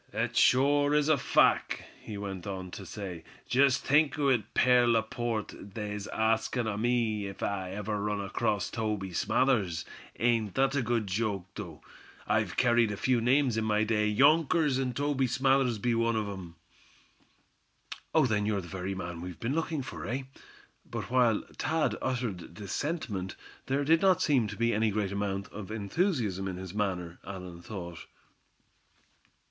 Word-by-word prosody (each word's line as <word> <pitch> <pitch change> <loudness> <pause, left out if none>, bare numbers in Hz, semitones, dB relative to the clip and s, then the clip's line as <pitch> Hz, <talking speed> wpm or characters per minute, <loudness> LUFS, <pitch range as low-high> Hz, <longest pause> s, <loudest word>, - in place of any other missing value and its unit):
"Thet - - -2
shore 145 +3 +4
is 150 0 +3
a 155 - +6
fack," - - +3 0.2
he 105 - -7
went 95 -3 -5
on 95 -2 -5
to 95 - -8
say. 90 -6 -6 0.2
"Jest 140 +1 +3
think 150 +2 +3
o' 145 -2 +2
it, 115 -5 0
Pierre 125 -1 +5
Laporte, 115 -1 0 0.2
they's 105 -1 -4
askin' 110 +2 +1
o' 105 - -1
me 110 -2 0
ef 95 - -7
I 95 -2 -2
ever 105 0 -3
run 105 0 -1
acrost 100 0 -1
Toby 105 -4 -2
Smathers? 100 -7 +1 0.3
Ain't 115 -4 +1
thet 135 0 +2
a 140 - +2
good 120 -2 0
joke, 100 -1 -1
though? 85 -9 -8 0.4
I've - - 0
kerried 120 -2 +4
a 100 - -4
few 125 -1 +2
names 125 0 +3
in 110 - +1
my 105 0 +2
day, 105 -1 +1
younkers, 145 +4 +4
an' 125 -2 -1
Toby 140 -2 +1
Smathers 130 -2 +2
be 120 +3 0
one 115 0 +1
o' 105 -2 -1
'em." 90 -3 -9 1.6
"Oh! - - +6
then 105 -4 +1
you're 105 -2 +1
the 85 - -10
very 95 +2 -4
man 85 -2 -5
we've 90 0 -7
been 120 +4 -1
looking 160 -2 -1
for, - - -7
eh?" 130 +3 -2 0.6
but - - -6
while 120 -4 +3 0.2
Thad 160 +2 +1
uttered 115 -10 -3
this 100 0 -7
sentiment, 110 - -3 0.3
there 135 +2 +1
did 165 +2 +4
not 190 -2 +4
seem 130 -7 +3
to 105 -1 -7
be 115 0 +2
any 110 +1 +2
great 100 -2 -1
amount 100 -1 -2
of 105 -1 -8
enthusiasm 110 - -1
in 95 -1 -4
his 95 0 -7
manner, 90 -5 -2
Allan 90 -3 -8
thought. 85 -4 -8
110 Hz, 165 wpm, -30 LUFS, 100-130 Hz, 1.6 s, a